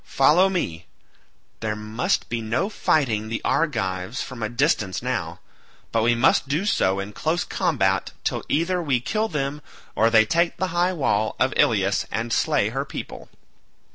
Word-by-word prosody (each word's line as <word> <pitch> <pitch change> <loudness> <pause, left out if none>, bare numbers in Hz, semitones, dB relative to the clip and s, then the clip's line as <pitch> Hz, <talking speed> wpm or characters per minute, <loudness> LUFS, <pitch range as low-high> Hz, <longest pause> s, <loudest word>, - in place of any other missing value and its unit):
Follow 165 +8 +4
me; 90 - -3 0.7
there 110 -1 -2
must 105 +3 -1
be 115 0 -3
no 115 - -1
fighting 115 - +1
the 115 - -2
Argives 100 - -1
from 130 -3 -6
a 110 - -1
distance 105 -5 0
now, - - -3 0.5
but 115 - +1
we 120 +1 +3
must 120 +3 +3
do 155 +8 -1
so 95 - +1
in 100 +2 -5
close 160 +8 -1
combat 95 - 0
till - - -2
either 175 +3 +1
we 140 -7 +1
kill 215 - -1
them 150 -4 -3 0.3
or 115 +1 +4
they 110 -1 +5
take 170 +5 +1
the 190 +1 -1
high 175 +1 +2
wall 110 - 0
of 130 - +2
Ilius 100 -2 +2
and 115 +3 -2
slay 145 -5 +2
her 135 +4 -2
people." 140 - -8
120 Hz, 165 wpm, -23 LUFS, 105-160 Hz, 0.7 s, they